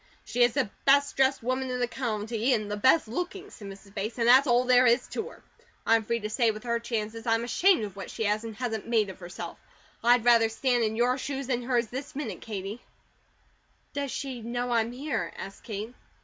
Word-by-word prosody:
"She 235 Hz, +3 st, -2 dB
is 240 Hz, -1 st, +5 dB
the 270 Hz, -5 st, +1 dB, 0.2 s
best 280 Hz, +1 st, +4 dB
dressed 270 Hz, -2 st, +2 dB
woman 255 Hz, +2 st, -1 dB
in 250 Hz, 0 st, -2 dB
the 245 Hz, -, +2 dB
county, 230 Hz, 0 st, -1 dB
and 210 Hz, -2 st, -3 dB
the -, -, -1 dB
best 260 Hz, +7 st, +4 dB
looking," 360 Hz, -, -5 dB
said 205 Hz, -, -10 dB
Mrs. 195 Hz, 0 st, -12 dB
Bates, 210 Hz, +4 st, -4 dB
"and 230 Hz, -1 st, +1 dB
that's 260 Hz, +4 st, +7 dB
all 240 Hz, 0 st, +4 dB
there 250 Hz, 0 st, +5 dB
is 240 Hz, +2 st, +3 dB
to -, -, -4 dB
her. -, -, -16 dB, 0.4 s
I'm 225 Hz, 0 st, +4 dB
free 235 Hz, +2 st, -1 dB
to 210 Hz, -, -2 dB
say 230 Hz, +2 st, +2 dB
with 215 Hz, 0 st, -4 dB
her 235 Hz, -1 st, 0 dB
chances, 225 Hz, -1 st, -4 dB
I'm 225 Hz, 0 st, +2 dB
ashamed 340 Hz, -, +3 dB
of 200 Hz, -2 st, -6 dB
what 195 Hz, -3 st, -7 dB
she -, -, -4 dB
has, 210 Hz, +1 st, +1 dB
and 225 Hz, -2 st, -7 dB
hasn't 225 Hz, -2 st, -3 dB
made 220 Hz, -4 st, +2 dB
of 185 Hz, -, -15 dB
herself. 175 Hz, -1 st, -8 dB, 0.4 s
I'd 240 Hz, 0 st, +4 dB
rather 230 Hz, -2 st, +5 dB
stand 245 Hz, +1 st, +1 dB
in 220 Hz, 0 st, 0 dB
your 250 Hz, +3 st, +2 dB
shoes, 275 Hz, 0 st, -4 dB
than 245 Hz, -1 st, -1 dB
hers, 240 Hz, -2 st, 0 dB
this 275 Hz, +3 st, -6 dB
minute, 250 Hz, -10 st, -5 dB
Katie." 205 Hz, +2 st, -6 dB, 1.1 s
"Does 285 Hz, -1 st, -2 dB
she 260 Hz, -2 st, -5 dB
know 245 Hz, +2 st, -3 dB
I'm 230 Hz, 0 st, +1 dB
here?" 250 Hz, -, -3 dB
asked 195 Hz, -, -9 dB
Kate. 215 Hz, +2 st, -5 dB
235 Hz, 220 wpm, -28 LUFS, 220-255 Hz, 1.1 s, that's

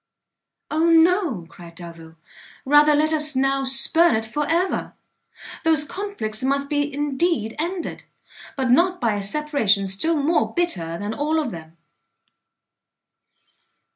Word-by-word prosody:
"O 315 Hz, +2 st, +1 dB
no," 330 Hz, -, +3 dB
cried 170 Hz, 0 st, -14 dB
Delvile, 165 Hz, -2 st, -12 dB, 0.5 s
"rather 295 Hz, +2 st, +5 dB
let 310 Hz, +2 st, +1 dB
us 305 Hz, -2 st, +2 dB
now 270 Hz, +1 st, +1 dB
spurn 270 Hz, +3 st, +3 dB
it 220 Hz, 0 st, -2 dB
for 290 Hz, +7 st, -3 dB
ever! 350 Hz, +3 st, -1 dB, 0.7 s
those 320 Hz, -2 st, +3 dB
conflicts 300 Hz, -, -5 dB
must 280 Hz, +2 st, -1 dB
indeed 290 Hz, -3 st, -1 dB
be -, -, -14 dB
ended, 345 Hz, +2 st, -4 dB, 0.5 s
but 260 Hz, -2 st, 0 dB
not 360 Hz, +7 st, +3 dB
by 230 Hz, -4 st, +1 dB
a 205 Hz, -, -3 dB
separation 220 Hz, -4 st, +1 dB
still 255 Hz, -, -1 dB
more 300 Hz, +4 st, 0 dB
bitter 175 Hz, -, -2 dB
than 205 Hz, +4 st, -4 dB
all 300 Hz, +5 st, -1 dB
of 305 Hz, -, -3 dB
them." 165 Hz, -1 st, -11 dB
285 Hz, 130 wpm, -22 LUFS, 215-320 Hz, 0.7 s, rather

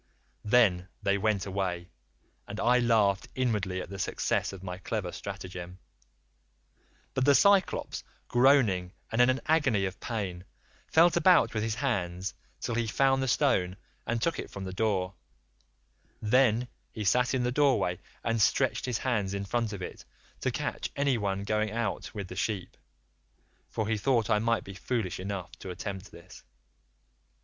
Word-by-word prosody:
"Then 105 Hz, -6 st, +3 dB, 0.2 s
they 100 Hz, 0 st, +2 dB
went 105 Hz, -2 st, +1 dB
away, 95 Hz, -3 st, -3 dB, 0.6 s
and 105 Hz, +2 st, -6 dB
I 125 Hz, +2 st, +4 dB
laughed 110 Hz, -5 st, +2 dB
inwardly 105 Hz, -7 st, 0 dB
at -, -, -11 dB
the 100 Hz, -, -6 dB
success -, -, 0 dB
of 95 Hz, -1 st, -10 dB
my 90 Hz, -1 st, -5 dB
clever 95 Hz, -2 st, -3 dB
stratagem, 90 Hz, -2 st, -7 dB, 1.4 s
but 130 Hz, -, +1 dB
the 140 Hz, +1 st, +6 dB
Cyclops, 200 Hz, +2 st, +3 dB, 0.2 s
groaning 120 Hz, -9 st, +3 dB, 0.2 s
and 115 Hz, +2 st, +3 dB
in 125 Hz, -, +6 dB
an 130 Hz, +1 st, +1 dB
agony 130 Hz, -11 st, +2 dB
of 95 Hz, 0 st, -5 dB
pain, 95 Hz, -7 st, -4 dB, 0.4 s
felt 170 Hz, +2 st, +5 dB
about 180 Hz, +1 st, +5 dB
with 110 Hz, -, -1 dB
his 110 Hz, 0 st, -1 dB
hands 95 Hz, -8 st, -2 dB, 0.3 s
till 120 Hz, -, -3 dB
he 115 Hz, 0 st, 0 dB
found 135 Hz, +4 st, +2 dB
the 130 Hz, -, 0 dB
stone 90 Hz, -6 st, +2 dB, 0.3 s
and 120 Hz, 0 st, 0 dB
took 165 Hz, +8 st, 0 dB
it -, -, -5 dB
from 100 Hz, -, -7 dB
the 95 Hz, -1 st, -5 dB
door; 95 Hz, -2 st, 0 dB, 1.1 s
then 120 Hz, +1 st, +3 dB, 0.2 s
he 110 Hz, -, -5 dB
sat 125 Hz, +6 st, +3 dB
in 125 Hz, -, +1 dB
the 125 Hz, -, +1 dB
doorway 130 Hz, -10 st, +2 dB, 0.2 s
and 115 Hz, -1 st, 0 dB
stretched 115 Hz, -, +2 dB
his 125 Hz, -3 st, 0 dB
hands 105 Hz, -7 st, -1 dB
in 100 Hz, 0 st, -3 dB
front 115 Hz, +1 st, -1 dB
of 100 Hz, -3 st, -6 dB
it -, -, -7 dB, 0.4 s
to -, -, 0 dB
catch -, -, -3 dB
anyone 105 Hz, -9 st, 0 dB
going 110 Hz, +1 st, 0 dB
out 110 Hz, -2 st, -3 dB
with 100 Hz, -3 st, -4 dB
the 90 Hz, -, -8 dB
sheep, 100 Hz, -1 st, -2 dB, 0.9 s
for 110 Hz, -, -2 dB
he 110 Hz, -1 st, 0 dB
thought 115 Hz, -1 st, +2 dB
I 105 Hz, -, +4 dB
might 115 Hz, +1 st, +1 dB
be 100 Hz, -, -9 dB
foolish 95 Hz, 0 st, -2 dB
enough 95 Hz, -1 st, -4 dB
to 95 Hz, -, -7 dB
attempt 95 Hz, +2 st, -6 dB
this. 90 Hz, +2 st, -14 dB
105 Hz, 160 wpm, -29 LUFS, 95-125 Hz, 1.4 s, the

